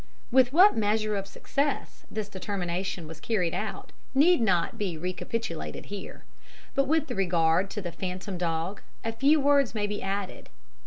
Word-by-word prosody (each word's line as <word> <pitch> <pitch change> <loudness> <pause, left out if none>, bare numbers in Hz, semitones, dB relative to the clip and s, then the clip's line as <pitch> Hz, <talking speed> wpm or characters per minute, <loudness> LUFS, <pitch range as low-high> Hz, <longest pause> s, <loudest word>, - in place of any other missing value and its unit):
"With 255 0 +5
what 370 +8 +7
measure 215 0 +1
of 195 -1 -3
success 280 +7 -2
this 215 -2 -3
determination 190 -2 -3
was 160 0 -9
carried 180 -3 0
out 195 0 -4 0.2
need 310 +1 +5
not 185 -6 +1
be 185 -6 -2
recapitulated 180 - -4
here; 200 - -7 0.5
but 275 0 +2
with 310 -1 +1
regard 175 -2 +2
to 210 -1 -5
the 175 - -3
phantom 185 +1 -5
dog 170 +3 -2 0.2
a 225 - -1
few 280 +6 +4
words 280 -4 +3
may 210 -1 0
be 205 0 -3
added. 195 0 -4
200 Hz, 155 wpm, -28 LUFS, 180-230 Hz, 0.5 s, what